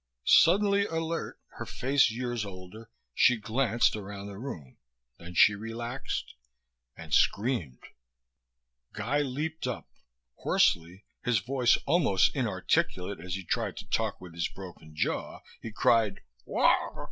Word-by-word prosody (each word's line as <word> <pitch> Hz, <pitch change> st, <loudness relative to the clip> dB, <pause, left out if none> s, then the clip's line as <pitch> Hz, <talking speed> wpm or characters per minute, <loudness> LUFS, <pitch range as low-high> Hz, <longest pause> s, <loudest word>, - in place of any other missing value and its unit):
Suddenly 200 Hz, +4 st, +5 dB
alert, 165 Hz, 0 st, -3 dB, 0.2 s
her -, -, -5 dB
face 135 Hz, 0 st, +2 dB
years 120 Hz, 0 st, -3 dB
older, 100 Hz, +3 st, -10 dB, 0.2 s
she 125 Hz, -, +4 dB
glanced 115 Hz, +1 st, +1 dB
around 100 Hz, -1 st, -7 dB
the 100 Hz, -1 st, -8 dB
room. 80 Hz, -, -8 dB, 0.4 s
Then 85 Hz, +1 st, -10 dB
she 105 Hz, -, +7 dB
relaxed.... 115 Hz, +5 st, -5 dB, 0.6 s
And 85 Hz, -2 st, -8 dB
screamed. 100 Hz, -, +1 dB, 1.1 s
Guy 125 Hz, +8 st, -1 dB
leaped 145 Hz, +2 st, -3 dB
up. 125 Hz, -, -5 dB, 0.5 s
Hoarsely, 85 Hz, +4 st, +1 dB, 0.2 s
his 125 Hz, -2 st, +2 dB
voice 120 Hz, +4 st, +2 dB
almost 140 Hz, -, +3 dB
inarticulate 90 Hz, +1 st, -1 dB
as 90 Hz, +2 st, -5 dB
he 95 Hz, -, -5 dB
tried -, -, -2 dB
to -, -, -9 dB
talk -, -, 0 dB
with 90 Hz, -2 st, -11 dB
his 85 Hz, -1 st, -1 dB
broken 90 Hz, -5 st, -12 dB
jaw, 80 Hz, -, -2 dB, 0.2 s
he 115 Hz, -, -6 dB
cried, 110 Hz, -1 st, +2 dB, 0.2 s
"Wha... -, -, +2 dB
110 Hz, 125 wpm, -29 LUFS, 95-130 Hz, 1.1 s, she